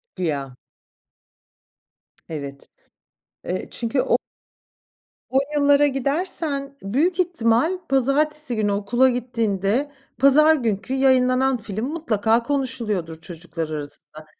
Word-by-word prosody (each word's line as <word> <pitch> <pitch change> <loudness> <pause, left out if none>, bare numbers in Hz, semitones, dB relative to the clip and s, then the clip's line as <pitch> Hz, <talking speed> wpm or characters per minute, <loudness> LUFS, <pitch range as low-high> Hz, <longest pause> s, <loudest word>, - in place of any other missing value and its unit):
Güya. 140 -7 -3 1.7
Evet. 140 -3 -7 0.8
Eee, 185 +1 -4
çünkü 245 +3 -1
o - - +2 1.1
O 265 - +1 0.2
yıllara 285 0 +5
gidersen, 280 0 -1
büyük 305 - 0
ihtimal 320 -1 +2
pazartesi 275 +1 +1
günü 210 -2 0
okula 240 +6 +2
gittiğinde 230 +1 -1 0.3
pazar 305 +4 +6
günkü 230 -1 -2
yayınlanan 260 0 +3
film 215 0 -5
mutlaka 230 -8 +1
konuşuluyordur 225 - -2
çocuklar 165 -1 -6
arasında. 150 +1 -6
245 Hz, 90 wpm, -22 LUFS, 195-280 Hz, 1.7 s, pazar